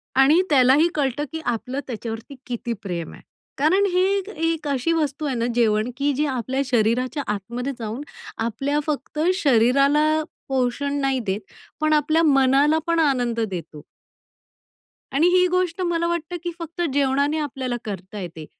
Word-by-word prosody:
आणि 280 Hz, +6 st, +6 dB
त्यालाही 280 Hz, +3 st, +5 dB
कळतं 280 Hz, -1 st, 0 dB
की 320 Hz, -, -4 dB
आपलं 245 Hz, +3 st, -2 dB
त्याच्यावरती 230 Hz, +2 st, -6 dB
किती 240 Hz, -1 st, -3 dB
प्रेम 175 Hz, -4 st, -4 dB
आहे -, -, -13 dB, 0.4 s
कारण 360 Hz, +8 st, +3 dB
हे 365 Hz, +1 st, +2 dB, 0.2 s
एक 395 Hz, +1 st, -4 dB
एक 330 Hz, -5 st, -2 dB
अशी 280 Hz, +3 st, 0 dB
वस्तू 300 Hz, -2 st, -1 dB
आहे 275 Hz, -3 st, -1 dB
ना, 230 Hz, -1 st, 0 dB
जेवण 220 Hz, -1 st, +2 dB
की 285 Hz, +1 st, +1 dB
जे 295 Hz, +3 st, 0 dB
आपल्या 260 Hz, -1 st, -1 dB
शरीराच्या 250 Hz, +4 st, +1 dB
आतमध्ये 235 Hz, +7 st, -4 dB
जाऊन 225 Hz, +3 st, -4 dB, 0.4 s
आपल्या 255 Hz, +6 st, -1 dB
फक्त 300 Hz, 0 st, -3 dB, 0.2 s
शरीराला 280 Hz, +3 st, +3 dB, 0.3 s
पोषण 270 Hz, +2 st, 0 dB
नाही 270 Hz, -1 st, +1 dB
देत. 195 Hz, 0 st, -1 dB, 0.4 s
पण 310 Hz, 0 st, +3 dB
आपल्या 310 Hz, +2 st, +3 dB
मनाला 275 Hz, +1 st, +4 dB
पण 335 Hz, 0 st, +2 dB
आनंद 250 Hz, -6 st, +1 dB
देतो. 180 Hz, -8 st, -4 dB, 1.3 s
आणि 300 Hz, +6 st, +4 dB
ही 365 Hz, 0 st, +4 dB
गोष्ट 365 Hz, 0 st, 0 dB
मला 340 Hz, -1 st, 0 dB
वाटतं 340 Hz, 0 st, -2 dB
की 345 Hz, -, -2 dB
फक्त 335 Hz, +1 st, -6 dB
जेवणाने 280 Hz, +2 st, +2 dB
आपल्याला 265 Hz, -4 st, -3 dB
करता 195 Hz, 0 st, -6 dB
येते 165 Hz, -4 st, -7 dB
275 Hz, 150 wpm, -23 LUFS, 240-310 Hz, 1.3 s, आणि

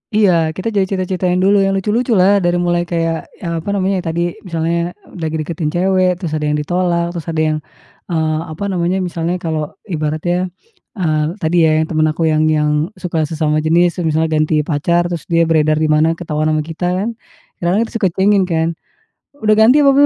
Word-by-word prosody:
Iya, 210 Hz, -3 st, +5 dB, 0.2 s
kita 210 Hz, +4 st, -3 dB
jadi 200 Hz, -3 st, +1 dB
cerita-ceritakan 185 Hz, -1 st, -1 dB
dulu, 200 Hz, +1 st, +4 dB
yang 195 Hz, 0 st, +2 dB
lucu-lucu 220 Hz, +5 st, 0 dB
lah. 195 Hz, +2 st, +4 dB
Dari 175 Hz, -2 st, +1 dB
mulai 175 Hz, 0 st, 0 dB
kayak, 165 Hz, -1 st, -2 dB, 0.2 s
eee, 170 Hz, -1 st, -2 dB
apa 165 Hz, -, -6 dB
namanya, 190 Hz, 0 st, 0 dB
yang 180 Hz, -, -6 dB
tadi 165 Hz, +1 st, -1 dB, 0.2 s
misalnya 170 Hz, 0 st, -2 dB, 0.2 s
lagi 160 Hz, -1 st, -2 dB
deketin 160 Hz, 0 st, -3 dB
cewek, 185 Hz, +2 st, +2 dB
terus 170 Hz, -3 st, -5 dB
ada 155 Hz, -1 st, -1 dB
yang 150 Hz, -, +1 dB
ditolak, 170 Hz, +2 st, 0 dB
terus 170 Hz, -3 st, -7 dB
ada 160 Hz, -1 st, -1 dB
yang, 155 Hz, 0 st, +1 dB, 0.5 s
eee, 160 Hz, -2 st, 0 dB
apa 155 Hz, +5 st, -6 dB
namanya, 180 Hz, 0 st, 0 dB
misalnya 170 Hz, 0 st, -2 dB
kalau 160 Hz, -4 st, -3 dB
ibaratnya, 175 Hz, +1 st, -1 dB, 0.5 s
eee, 155 Hz, -6 st, 0 dB, 0.2 s
tadi 160 Hz, +2 st, +1 dB
ya -, -, +3 dB
yang -, -, -5 dB
teman 155 Hz, -1 st, +2 dB
aku 165 Hz, -, -1 dB
yang 155 Hz, 0 st, +2 dB
yang 150 Hz, -1 st, +2 dB, 0.2 s
suka 180 Hz, -3 st, -3 dB
sesama 155 Hz, -1 st, 0 dB
jenis, 170 Hz, +3 st, +2 dB
terus 170 Hz, -, 0 dB
misalnya 160 Hz, +1 st, +1 dB
ganti 155 Hz, 0 st, +1 dB
pacar, 170 Hz, +3 st, +1 dB
terus 170 Hz, -3 st, -5 dB
dia 165 Hz, -1 st, +3 dB
beredar 155 Hz, -2 st, +2 dB
di 155 Hz, 0 st, +1 dB
mana 155 Hz, +2 st, +3 dB
ketahuan 155 Hz, -2 st, -2 dB
sama 155 Hz, -, 0 dB
kita, 165 Hz, +3 st, -5 dB, 0.2 s
kan, 225 Hz, -, -1 dB, 0.5 s
kadang-kadang 180 Hz, +6 st, +1 dB
tuh -, -, -16 dB
suka 195 Hz, -, +3 dB
kuingin, 195 Hz, 0 st, +3 dB
kan, 165 Hz, -2 st, 0 dB, 0.8 s
"Udah 215 Hz, 0 st, +4 dB
ganti 250 Hz, +7 st, +6 dB
apa 280 Hz, -, +6 dB
belum 280 Hz, +1 st, +5 dB
170 Hz, 200 wpm, -17 LUFS, 155-185 Hz, 0.8 s, ganti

